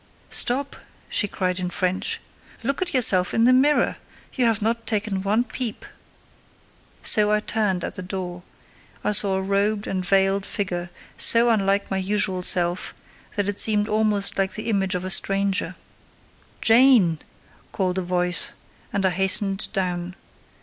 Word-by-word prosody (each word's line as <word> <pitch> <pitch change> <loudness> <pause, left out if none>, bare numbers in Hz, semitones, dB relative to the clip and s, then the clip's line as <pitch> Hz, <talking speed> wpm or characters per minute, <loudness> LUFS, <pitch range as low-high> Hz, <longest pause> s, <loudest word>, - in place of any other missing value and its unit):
"Stop!" 275 +3 -1 0.3
she 205 - 0
cried 185 -1 -2
in 180 -1 -3
French. 185 +1 -2 0.4
"Look 275 +7 -2
at 360 -1 -1
yourself 195 -9 +4
in 225 - +2
the 255 - +5
mirror: 285 +4 +2 0.4
you 255 - 0
have 225 -2 +1
not 230 +1 -2
taken 210 -3 -1
one 210 +5 +1
peep." 245 -3 -5 1.2
So 210 -1 +4
I 210 0 +2
turned 210 -4 -2
at - - -5
the 185 - -7
door: 180 -1 -6 0.6
I - - 0
saw 200 -2 +3
a 190 - -1
robed 200 +2 0
and 185 -1 -3
veiled 195 +1 +1
figure, 180 -4 -4 0.3
so 235 +1 +5
unlike 200 -2 0
my 195 - 0
usual 190 -1 0
self 175 0 0 0.4
that 205 -1 -1
it 205 -1 -3
seemed 210 -1 +2
almost 210 -2 +1
the 195 -1 +1 0.2
image 195 -3 0
of 180 0 -4
a 185 - -1
stranger. 195 0 +2 0.9
"Jane!" 225 - +4 0.5
called 185 -1 -2
a - - -2
voice, 180 0 0 0.4
and 200 -1 -1
I 190 - +2
hastened 195 +2 +1
down. 180 -2 -3
195 Hz, 150 wpm, -23 LUFS, 185-215 Hz, 1.2 s, the